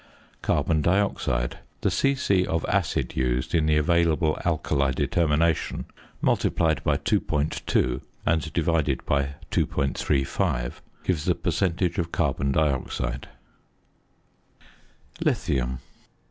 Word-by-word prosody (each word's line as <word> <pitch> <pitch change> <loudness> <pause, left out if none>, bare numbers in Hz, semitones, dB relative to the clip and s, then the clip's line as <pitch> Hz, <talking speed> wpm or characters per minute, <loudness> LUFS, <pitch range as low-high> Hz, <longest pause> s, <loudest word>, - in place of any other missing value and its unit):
~Carbon 80 -2 +1
Dioxide.~ 85 -9 0 0.2
The - - +1
c.c. 130 -9 +2
of 80 - -1
acid - - 0
used 65 0 0
in 80 -2 +3
the 75 -1 +3
available 80 0 +2
alkali 75 -4 +1
determination, 80 +3 +1 0.4
multiplied 80 -1 +1
by - - +2
2.2 70 -4 0 0.2
and 80 0 +1
divided 80 -5 0
by 70 0 0 0.2
2.35, 65 -3 0 0.3
gives 85 -5 -1
the - - +2
percentage 90 -1 0
of 85 -1 -2
carbon 70 0 0
dioxide. 65 -3 -1 1.9
LITHIUM. 65 -2 0
75 Hz, 95 wpm, -25 LUFS, 70-85 Hz, 1.9 s, in